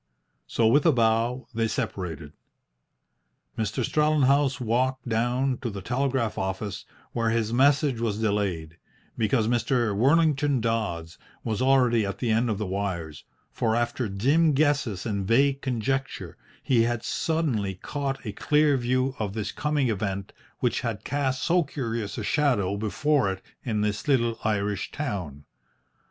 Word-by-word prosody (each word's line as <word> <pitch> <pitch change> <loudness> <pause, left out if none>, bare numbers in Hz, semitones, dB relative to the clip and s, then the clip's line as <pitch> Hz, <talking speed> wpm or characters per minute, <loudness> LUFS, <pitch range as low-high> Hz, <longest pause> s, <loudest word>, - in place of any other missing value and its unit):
So, 115 - +1
with 140 +6 +5
a - - +7
bow, 115 +1 +1
they 115 0 +1
separated. 80 -8 -4 1.2
Mr. 110 +3 -1
Strellenhaus 145 -3 +2
walked, 125 +2 0
down 120 +3 0
to 120 - -3
the 100 -3 -7
telegraph 130 -2 -1
office, 95 +1 -3 0.3
where 115 -1 0
his 115 -1 0
message 140 0 +3
was 110 -3 -1
delayed 100 -7 -1 0.4
because 110 0 +1
Mr. 120 -2 +1
Worlington 145 +2 +3
Dodds 105 -8 -2 0.2
was 110 -1 -2
already 125 -4 +4
at 100 -1 -3
the 120 -3 -1
end 115 +2 +2
of 105 - -1
the 105 - -2
wires, 90 -5 -4 0.3
for, 110 -1 0
after 120 -1 -1
dim 145 +11 +3
guesses 140 -9 +1
and 100 -4 -2
vague 135 +4 +3
conjecture, 130 +1 -2 0.3
he 125 -4 +3
had 120 0 0
suddenly 130 - -1
caught 135 +7 -4
a 105 - -3
clear 150 +3 +2
view 130 +2 0
of 105 -3 -2
this 110 -2 -3
coming 145 -3 0
event 100 -2 -3 0.3
which - - +1
had - - -3
cast 135 -2 -1
so 175 +1 +3
curious 115 -8 -4
a - - -3
shadow 125 -10 +1
before 110 +4 +1
it 95 0 -7 0.2
in 110 -5 -1
this 105 +5 -2
little 120 -5 +2
Irish 105 -2 -1
town. 90 - -4
115 Hz, 145 wpm, -26 LUFS, 105-135 Hz, 1.2 s, a